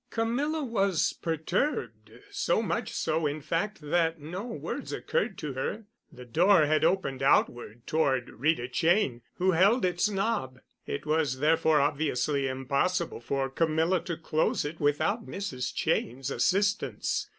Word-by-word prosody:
Camilla 275 Hz, +8 st, -1 dB
was 200 Hz, -, +1 dB
perturbed—so 150 Hz, -, -2 dB
much 170 Hz, -5 st, -2 dB
so, 160 Hz, 0 st, 0 dB
in 145 Hz, +2 st, -3 dB
fact, 165 Hz, +7 st, -2 dB
that 165 Hz, +2 st, +1 dB
no 170 Hz, +7 st, -6 dB
words 230 Hz, -, -5 dB
occurred -, -, -1 dB
to 150 Hz, -3 st, -5 dB
her. 170 Hz, -, -3 dB, 0.3 s
The 125 Hz, -, -11 dB
door 170 Hz, -, +4 dB
had 155 Hz, +1 st, +2 dB
opened 135 Hz, -9 st, +1 dB
outward 120 Hz, -3 st, +1 dB
toward 135 Hz, -5 st, +1 dB
Rita 130 Hz, 0 st, 0 dB
Cheyne, 160 Hz, -, +1 dB
who 185 Hz, +1 st, +2 dB
held 195 Hz, +7 st, +4 dB
its 180 Hz, +3 st, +1 dB
knob. 195 Hz, -, -1 dB, 0.3 s
It 140 Hz, -, -4 dB
was, 150 Hz, -4 st, +1 dB
therefore, 160 Hz, +1 st, +3 dB
obviously 145 Hz, -1 st, 0 dB
impossible 140 Hz, +7 st, -1 dB
for 135 Hz, +3 st, -1 dB
Camilla 160 Hz, +5 st, +1 dB
to 170 Hz, -2 st, -3 dB
close 160 Hz, -2 st, 0 dB
it 155 Hz, +2 st, -5 dB
without 160 Hz, +10 st, 0 dB
Mrs. 140 Hz, -11 st, -4 dB
Cheyne's 130 Hz, +3 st, -1 dB
assistance. 200 Hz, -, 0 dB
160 Hz, 135 wpm, -28 LUFS, 135-190 Hz, 0.3 s, door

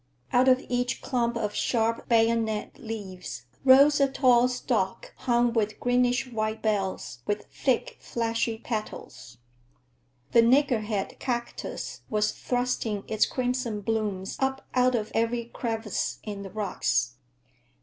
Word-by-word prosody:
Out 250 Hz, +1 st, +5 dB
of 260 Hz, 0 st, +4 dB
each 245 Hz, 0 st, -1 dB
clump 235 Hz, -2 st, 0 dB
of 210 Hz, -2 st, -2 dB
sharp 230 Hz, -1 st, 0 dB
bayonet 225 Hz, 0 st, +1 dB
leaves 190 Hz, -, -7 dB, 0.2 s
rose 275 Hz, +2 st, +7 dB
a 275 Hz, -, +5 dB
tall 250 Hz, -2 st, +5 dB
stalk 235 Hz, -6 st, -2 dB
hung 240 Hz, -1 st, +1 dB
with 215 Hz, -2 st, 0 dB
greenish 245 Hz, +1 st, +2 dB
white 215 Hz, -1 st, -2 dB
bells 195 Hz, -, -1 dB
with 205 Hz, 0 st, -1 dB
thick, 260 Hz, -4 st, 0 dB
fleshy 230 Hz, -1 st, -1 dB
petals. 215 Hz, -, -6 dB, 0.9 s
The 235 Hz, -, +7 dB
niggerhead 230 Hz, -5 st, +2 dB
cactus 240 Hz, -2 st, -4 dB
was 210 Hz, -1 st, +1 dB
thrusting 245 Hz, -4 st, -2 dB
its 220 Hz, -1 st, +2 dB
crimson 250 Hz, -4 st, -2 dB
blooms 205 Hz, -3 st, -2 dB
up 265 Hz, 0 st, -1 dB
out 255 Hz, 0 st, +3 dB
of 215 Hz, -2 st, -2 dB
every 230 Hz, +1 st, 0 dB
crevice 225 Hz, -2 st, -3 dB
in 205 Hz, -2 st, -5 dB
the 195 Hz, -, -7 dB
rocks. 125 Hz, -, -1 dB
230 Hz, 125 wpm, -27 LUFS, 210-245 Hz, 0.9 s, rose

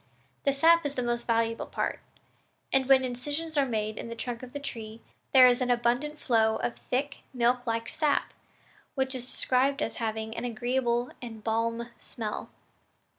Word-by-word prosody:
The 280 Hz, -, +5 dB
sap 335 Hz, +4 st, +5 dB
is 290 Hz, -1 st, -3 dB
the 250 Hz, -, -1 dB
most 240 Hz, 0 st, -2 dB
valuable 230 Hz, 0 st, +1 dB
part; -, -, -2 dB, 0.7 s
and 265 Hz, -1 st, +3 dB
when 265 Hz, -1 st, +7 dB
incisions 290 Hz, +6 st, -3 dB
are 280 Hz, -2 st, +3 dB
made 215 Hz, -2 st, -2 dB
in -, -, -6 dB
the 230 Hz, -, -5 dB
trunk 235 Hz, 0 st, -4 dB
of 255 Hz, -1 st, -9 dB
the 285 Hz, -, -5 dB
tree, 225 Hz, -5 st, -7 dB, 0.3 s
there 260 Hz, -2 st, +9 dB
is 245 Hz, +1 st, +3 dB
an 250 Hz, -, 0 dB
abundant 245 Hz, +5 st, +1 dB
flow 220 Hz, -5 st, +2 dB
of 235 Hz, -, -2 dB
thick 270 Hz, +3 st, -2 dB, 0.2 s
milk 245 Hz, +1 st, +2 dB
like 230 Hz, 0 st, -1 dB
sap, 300 Hz, +1 st, 0 dB, 0.6 s
which 265 Hz, -1 st, 0 dB
is 255 Hz, -1 st, -5 dB
described 270 Hz, +2 st, +1 dB
as -, -, -2 dB
having 220 Hz, -1 st, -3 dB
an 230 Hz, -, -4 dB
agreeable 240 Hz, +1 st, 0 dB
and 225 Hz, -3 st, -8 dB
balmv 230 Hz, +1 st, -1 dB
smell. 215 Hz, -3 st, -5 dB
245 Hz, 175 wpm, -29 LUFS, 230-270 Hz, 0.7 s, there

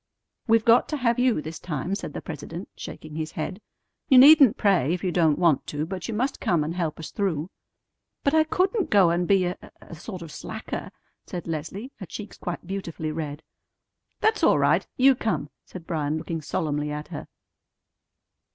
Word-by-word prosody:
"We've 225 Hz, -1 st, +4 dB
got 235 Hz, +1 st, +5 dB
to 300 Hz, -, -1 dB
have 240 Hz, -3 st, +1 dB
you 245 Hz, -10 st, +2 dB
this 160 Hz, +1 st, -7 dB
time," 165 Hz, +2 st, -3 dB
said 200 Hz, -, -4 dB
the -, -, -6 dB
president, 165 Hz, +3 st, -7 dB
shaking 155 Hz, -1 st, -9 dB
his 160 Hz, 0 st, -4 dB
head. 185 Hz, +6 st, -4 dB, 0.5 s
"You 265 Hz, -, +7 dB
needn't 275 Hz, -3 st, +8 dB
pray 185 Hz, -8 st, +3 dB
if 180 Hz, -, -8 dB
you 185 Hz, -, 0 dB
don't 160 Hz, -4 st, +3 dB
want 170 Hz, -6 st, +2 dB
to, 150 Hz, +1 st, -2 dB
but 185 Hz, +2 st, -5 dB
you 230 Hz, -, -3 dB
must 260 Hz, +5 st, -1 dB
come 170 Hz, -4 st, +1 dB
and 155 Hz, +2 st, -3 dB
help 170 Hz, -4 st, -2 dB
us 160 Hz, -, -7 dB
through." 180 Hz, -4 st, -2 dB, 0.7 s
"But 280 Hz, -, +2 dB
I 315 Hz, 0 st, +5 dB
couldn't 375 Hz, +6 st, 0 dB
go 190 Hz, -5 st, +5 dB
and 175 Hz, +1 st, 0 dB
be 195 Hz, -2 st, +4 dB
a 180 Hz, +1 st, -2 dB, 0.2 s
a -, -, -13 dB
sort 175 Hz, +2 st, -7 dB
of 165 Hz, -, -10 dB
slacker!" -, -, -6 dB, 0.4 s
said 175 Hz, -2 st, -5 dB
Leslie, 170 Hz, -, -5 dB
her 190 Hz, -, -8 dB
cheeks 205 Hz, +5 st, -8 dB
quite 175 Hz, -1 st, -5 dB
beautifully 170 Hz, -4 st, -4 dB
red. 150 Hz, -1 st, -5 dB, 0.8 s
"That's 435 Hz, -1 st, +2 dB
all -, -, +5 dB
right! -, -, +2 dB
You 270 Hz, +1 st, +6 dB
come!" 155 Hz, -, -2 dB
said 180 Hz, -3 st, -10 dB
Bryan, 155 Hz, -3 st, -1 dB
looking 165 Hz, 0 st, -4 dB
solemnly 150 Hz, -1 st, -2 dB
at 150 Hz, +1 st, -5 dB
her. -, -, -7 dB
175 Hz, 190 wpm, -25 LUFS, 155-220 Hz, 0.8 s, needn't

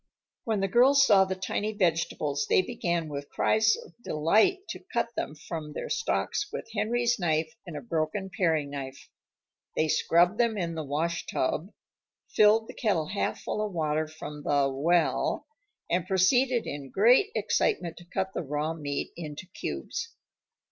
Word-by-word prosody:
When 220 Hz, -3 st, 0 dB
the 195 Hz, -, +1 dB
girls 270 Hz, +7 st, +5 dB
saw 195 Hz, -6 st, +6 dB
the 190 Hz, 0 st, -3 dB
tiny 205 Hz, +3 st, -2 dB
vegetables 165 Hz, -6 st, 0 dB
they 185 Hz, -, +4 dB
began 170 Hz, -3 st, -2 dB
with 140 Hz, -1 st, -6 dB
cries 220 Hz, 0 st, +3 dB
of -, -, -12 dB
delight 215 Hz, -, +2 dB
to -, -, -6 dB
cut 235 Hz, -1 st, 0 dB
them 150 Hz, -, -3 dB
from 155 Hz, -1 st, -7 dB
their -, -, -5 dB
stalks 460 Hz, +1 st, -1 dB
with -, -, -5 dB
Henry's 235 Hz, +2 st, +1 dB
knife 160 Hz, -2 st, 0 dB
and 160 Hz, -3 st, -6 dB
a -, -, -5 dB
broken 165 Hz, -, -2 dB
paring 160 Hz, -6 st, +1 dB
knife. 135 Hz, -1 st, -7 dB, 0.6 s
They 155 Hz, -, +2 dB
scrubbed 175 Hz, +6 st, +3 dB
them 230 Hz, -3 st, +2 dB
in 170 Hz, -3 st, -2 dB
the 160 Hz, -1 st, -4 dB
"washtub," 155 Hz, +3 st, -2 dB, 0.6 s
filled 215 Hz, +1 st, +5 dB
the -, -, -9 dB
kettle 170 Hz, -9 st, 0 dB
half 200 Hz, -, -2 dB
full 210 Hz, -, -2 dB
of 210 Hz, -2 st, -4 dB
water 155 Hz, -1 st, 0 dB
from 150 Hz, -1 st, -8 dB
the 140 Hz, -1 st, +2 dB
"well," 165 Hz, +5 st, +1 dB, 0.4 s
and 175 Hz, +1 st, 0 dB
proceeded 240 Hz, +6 st, +3 dB
in 140 Hz, -2 st, -6 dB
great 245 Hz, -, +5 dB
excitement 175 Hz, -, 0 dB
to 175 Hz, -, -12 dB
cut 190 Hz, +2 st, -3 dB
the -, -, -2 dB
raw 150 Hz, +1 st, -2 dB
meat 145 Hz, -3 st, -4 dB
into 155 Hz, +1 st, -7 dB
cubes. 460 Hz, -, -5 dB
175 Hz, 160 wpm, -28 LUFS, 155-215 Hz, 0.6 s, saw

